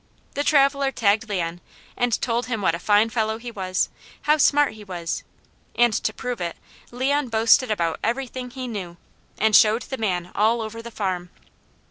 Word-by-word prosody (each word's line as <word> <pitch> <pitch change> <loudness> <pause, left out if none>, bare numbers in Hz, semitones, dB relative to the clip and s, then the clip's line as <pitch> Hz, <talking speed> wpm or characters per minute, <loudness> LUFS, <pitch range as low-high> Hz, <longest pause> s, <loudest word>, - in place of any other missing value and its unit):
The 285 - -1
traveller 275 -1 +3
tagged 220 -2 +1
Leon 175 -3 -2 0.3
and 245 -2 +1
told 240 0 -1
him 230 -3 -2
what 175 -5 +2
a 170 - -3
fine 210 +4 +3
fellow 220 -1 0
he 240 +1 -8
was, 185 -4 -1 0.3
how 300 +1 +4
smart 290 -2 +4
he 215 -1 -11
was, 175 -4 -4 0.5
and 240 -2 +4
to 215 - 0
prove 245 0 -5
it, 170 -1 -3 0.3
Leon 265 +2 0
boasted 225 +2 +4
about 170 -6 -1
everything 255 +1 -2
he 255 0 -6
knew, 185 -7 -6 0.4
and 220 0 +3
showed 220 +1 +5
the 265 - -6
man 180 -5 -1
all 225 +3 +2
over 225 +1 -6
the 235 - -8
farm. 185 -5 -3
225 Hz, 175 wpm, -23 LUFS, 200-250 Hz, 0.5 s, showed